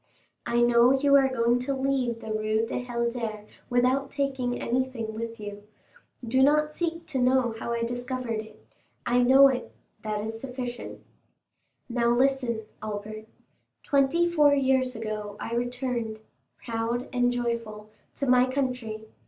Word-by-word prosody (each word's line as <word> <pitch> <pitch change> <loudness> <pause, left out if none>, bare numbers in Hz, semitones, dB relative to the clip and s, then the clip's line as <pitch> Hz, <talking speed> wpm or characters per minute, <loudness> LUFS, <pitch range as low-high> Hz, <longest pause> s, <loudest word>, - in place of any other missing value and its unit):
I 240 0 +2
know 240 +1 +5
you 280 0 +4
are 270 -1 +5
going 240 -1 +2
to 270 +2 -2
leave 265 -3 -1
the 220 - -6
Rue 215 +1 0
du 235 - -3
Helder 235 -3 -3 0.2
without 255 +2 +2
taking 265 -3 -2
anything 245 -3 -2
with 230 +1 -6
you. 205 -1 -7 0.7
Do 260 +3 +2
not 300 +2 +3
seek 335 -1 -3
to 285 -5 -3
know 250 -2 +3
how 235 - -4
I 235 0 -1
discovered 245 -1 -3
it; 220 0 -11 0.4
I 245 +1 +3
know 265 +3 +7
it—that 215 -4 -5
is 225 +1 -5
sufficient. 250 -2 -6 0.9
"Now, 235 -1 0
listen, 250 -2 +1 0.2
Albert. 215 +1 -6 0.6
Twenty 285 +5 +2
four 300 -4 +4
years 260 -2 +2
ago 215 -2 -5
I 230 - -5
returned, 245 -2 -2 0.5
proud 230 +2 -2
and 245 0 +2
joyful, 230 -3 -3 0.2
to 280 - -2
my 255 0 +4
country. 250 -5 -3
245 Hz, 140 wpm, -27 LUFS, 225-265 Hz, 0.9 s, know